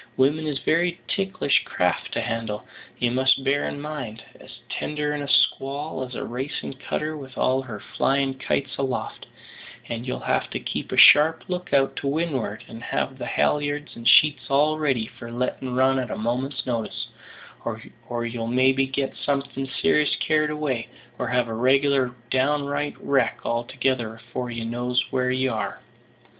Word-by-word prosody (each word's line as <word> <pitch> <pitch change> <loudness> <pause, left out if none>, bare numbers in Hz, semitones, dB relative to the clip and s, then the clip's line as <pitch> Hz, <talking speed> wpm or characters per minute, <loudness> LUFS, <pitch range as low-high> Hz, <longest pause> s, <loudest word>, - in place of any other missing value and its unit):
Women 150 +4 +3
is 145 -2 -1
very 170 +4 +1
ticklish 195 -7 +1
craft - - -1
to - - 0
handle, 115 -2 -3 0.3
you 120 -1 +1
must 130 +1 +3
bear 140 +1 +1
in 145 - -4
mind; 145 -7 -6 0.2
as - - -14 0.2
tender 150 0 -2
in 150 - -3
a 140 - -4
squall 140 +1 +1
as 125 -1 -7
a - - -3
racin' 130 +3 -4
cutter 150 +3 -3
with 135 -4 -10
all 130 +1 +2
her 115 -6 -7
flyin' 135 +5 0
kites 140 0 -1
aloft; 135 -2 -3 0.6
and 115 0 -4
you'll - - -2
have - - 0
to - - -3
keep - - -4
a - - -2
sharp 160 +2 +8
look 180 0 -4
out 135 -1 +3
to 140 - -2
win'ard, 140 -8 -1
and 115 0 -9
have 130 +2 -2
the - - -4
halliards 145 0 0
and 115 0 -4
sheets 150 -1 +5
all 150 +3 +3
ready 135 -7 +1
for 115 0 -10
lettin' 125 +1 -2
run 130 +1 +4
at 125 -3 -3
a - - -3
moment's 125 +5 -2
notice, 115 -3 -3 0.5
or 120 0 -5
you'll 115 -1 -3
maybe 130 +2 +3
get 135 0 -2
something 140 -1 -2 0.2
ser'ous 150 -8 +4
carried 155 -1 +2
away, 150 -6 -2 0.3
or 125 - -1
have 120 0 +1
a 115 - -4
reg'lar 130 +1 +3 0.2
downright 145 +2 +1
wrack 135 -2 +1
altogether 120 -1 -1
afore 120 +2 -5
you 115 -1 -4
knows 120 +2 -1
where 125 -1 +1
you 130 0 +1
are." 110 - -3
135 Hz, 170 wpm, -24 LUFS, 120-145 Hz, 0.6 s, sharp